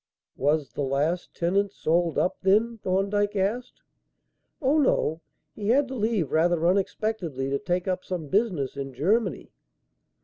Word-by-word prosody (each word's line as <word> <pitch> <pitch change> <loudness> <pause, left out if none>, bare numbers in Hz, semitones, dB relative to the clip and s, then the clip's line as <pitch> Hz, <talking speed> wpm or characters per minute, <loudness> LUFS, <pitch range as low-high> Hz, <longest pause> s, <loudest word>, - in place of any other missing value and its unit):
"Was 145 0 0
the - - -4
last 145 +6 -1
tenant 195 +4 +1
sold 170 -2 0
up, 180 - +1
then?" 220 +4 +2
Thorndyke 200 +2 0
asked. 220 +6 -2 0.8
"Oh, 290 +2 +2
no. 165 - +1 0.3
He 205 -2 -5
had 270 +4 +4
to - - -5
leave 215 - 0
rather 170 +1 +2
unexpectedly 180 -7 -1
to 140 - 0
take 180 +5 -2
up 185 0 -1
some 175 -5 -4
business 185 - 0
in 135 -2 -6
Germany." 195 - 0
185 Hz, 140 wpm, -26 LUFS, 160-210 Hz, 0.8 s, had